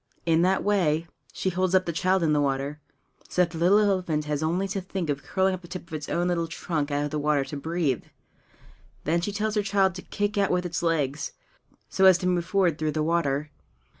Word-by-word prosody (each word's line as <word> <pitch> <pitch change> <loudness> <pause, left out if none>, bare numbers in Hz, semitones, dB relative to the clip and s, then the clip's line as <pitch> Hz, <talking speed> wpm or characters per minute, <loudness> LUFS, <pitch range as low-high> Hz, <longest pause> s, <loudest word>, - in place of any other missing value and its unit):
In 165 -1 +3
that 185 +2 +2
way 170 -6 +2 0.3
she 190 - -2
holds 185 +1 +1
up 185 0 +3
the 170 - -2
child 185 +2 +2
in 155 -2 +3
the 145 - +3
water, 140 +2 -2 0.5
so 180 - +3
that 170 - -3
the 165 - -6
little 180 +5 +5
elephant 185 -7 +1
has 150 -1 -2
only 175 +5 0
to 195 0 -2
think 185 -4 -3
of 140 -1 -3
curling 190 0 +1
up 185 - -5
the 175 - -12
tip 185 +1 -6
of 165 - -14
its 150 -1 -5
own 175 +1 0
little 170 -2 0
trunk 160 -2 -3
out 145 0 0
of 145 - -5
the 150 - -1
water 145 -2 +1
to 150 - -7
breathe. 155 - -1 1.0
Then 170 +3 +1
she 205 - -2
tells 215 +1 -1
her 210 - +2
child 195 -2 +2
to 185 - -7
kick 205 +2 -2
out 195 - +2
with 180 0 0
its 170 -1 -2
legs, 150 -4 -1 0.5
so 190 - +2
as 190 -2 +8
to 180 - -2
move 175 -2 +1
forward 180 -3 +1
through 155 -1 -1
the 155 - 0
water. 150 -3 0
170 Hz, 235 wpm, -26 LUFS, 150-185 Hz, 1.0 s, as